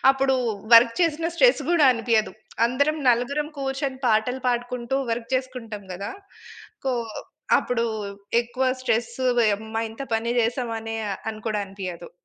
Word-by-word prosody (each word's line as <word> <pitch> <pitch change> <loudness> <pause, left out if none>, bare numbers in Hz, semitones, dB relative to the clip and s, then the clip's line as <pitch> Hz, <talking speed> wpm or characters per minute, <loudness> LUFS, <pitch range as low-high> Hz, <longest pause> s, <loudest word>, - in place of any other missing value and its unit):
అప్పుడు 270 0 +2 0.4
వర్క్ 230 0 +8
చేసిన 330 -1 +1
స్ట్రెస్ - - +4
గూడా 340 -4 +4
అనిపియదు. 230 -2 +1 0.3
అందరం 285 +6 +1
నలుగురం 265 +5 +1
కూర్చొని 270 -1 -2
పాటలు 235 +4 +2
పాడుకుంటూ 245 +1 -1
వర్క్ 230 0 -3
చేసుకుంటాం 235 -6 -4
గదా! 195 +3 -5 0.8
కో 260 - +2 0.6
అప్పుడు 235 -1 -1 0.6
ఎక్కువ 250 +3 -2 0.2
స్ట్రెస్, 235 -2 0 0.3
ఓయమ్మా! 220 +1 0
ఇంత 225 +5 -7
పని 230 +1 0
చేసామనే 225 -1 -2 0.3
అని 215 -1 -10
కూడా 210 -1 0
అనిపియదు. 185 -3 -7
235 Hz, 125 wpm, -24 LUFS, 225-265 Hz, 0.8 s, వర్క్